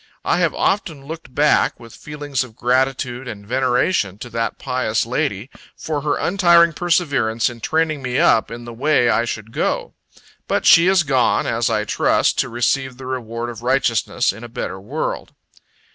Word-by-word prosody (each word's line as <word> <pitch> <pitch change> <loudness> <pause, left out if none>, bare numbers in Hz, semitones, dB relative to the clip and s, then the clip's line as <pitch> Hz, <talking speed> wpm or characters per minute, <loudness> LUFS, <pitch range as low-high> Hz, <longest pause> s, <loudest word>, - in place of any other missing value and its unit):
I - - +2
have - - +1
often 160 -9 -1
looked 160 -3 -9
back, 150 +1 +2
with 115 -2 -13
feelings 145 -3 -4
of 115 -4 -13
gratitude 130 0 0
and 100 -3 -8
veneration, 125 - 0
to 120 +3 -9
that 115 0 -2
pious 125 -5 -1
lady, 125 -2 -2 0.3
for 150 -2 -3
her 150 +1 0
untiring 170 -3 +4
perseverance 145 -10 +1
in 120 - -12
training 155 0 0
me 125 -1 -2
up 110 - +3
in 120 +1 -8
the 120 - -8
way 125 0 +2
I 115 +2 +1
should 110 -1 -6
go. - - -2 0.5
But - - 0
she 170 +1 +7
is 190 -2 +4
gone, 135 -4 +2
as - - 0
I - - 0
trust, - - +1
to 130 - 0
receive 125 +2 -1
the 130 - -10
reward 120 -2 -4
of 115 -1 -10
righteousness, 120 -6 +1
in 110 +3 -11
a 120 - -8
better 95 -4 -5
world. 100 - -4
130 Hz, 175 wpm, -20 LUFS, 115-150 Hz, 0.5 s, she